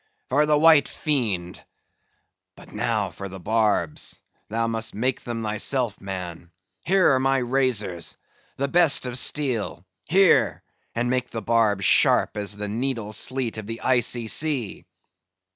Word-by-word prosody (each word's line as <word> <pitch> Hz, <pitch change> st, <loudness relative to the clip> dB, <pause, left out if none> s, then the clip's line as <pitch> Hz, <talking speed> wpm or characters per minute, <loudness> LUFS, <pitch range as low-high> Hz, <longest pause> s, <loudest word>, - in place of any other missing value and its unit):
"For 150 Hz, +4 st, +2 dB
the 150 Hz, -1 st, +3 dB
white 155 Hz, -1 st, +6 dB
fiend! 105 Hz, -, -2 dB, 0.9 s
But -, -, -15 dB
now -, -, -1 dB
for 100 Hz, 0 st, -8 dB
the 95 Hz, +1 st, -9 dB
barbs; 105 Hz, -5 st, -1 dB, 0.3 s
thou 115 Hz, +2 st, -1 dB
must 115 Hz, -1 st, -2 dB
make 125 Hz, +4 st, -1 dB
them 115 Hz, -1 st, -5 dB
thyself, 110 Hz, +1 st, -2 dB
man. 90 Hz, -3 st, -7 dB, 0.4 s
Here 185 Hz, -5 st, +4 dB
are 130 Hz, -, +2 dB
my 135 Hz, +1 st, +2 dB
razors—the 125 Hz, -, -2 dB
best 155 Hz, -3 st, +4 dB
of 125 Hz, 0 st, -1 dB
steel; 130 Hz, -11 st, -1 dB, 0.2 s
here, 190 Hz, +2 st, +3 dB, 0.3 s
and 120 Hz, +1 st, 0 dB
make 125 Hz, -1 st, -1 dB
the 115 Hz, -2 st, -6 dB
barbs 105 Hz, -4 st, +1 dB
sharp -, -, +3 dB
as 105 Hz, 0 st, -2 dB
the 105 Hz, 0 st, -4 dB
needle 115 Hz, -1 st, -3 dB
sleet 125 Hz, 0 st, -1 dB
of 105 Hz, -, -9 dB
the 115 Hz, +1 st, -6 dB
Icy 120 Hz, -2 st, +1 dB
Sea." 140 Hz, -4 st, -1 dB
115 Hz, 140 wpm, -24 LUFS, 105-135 Hz, 0.9 s, white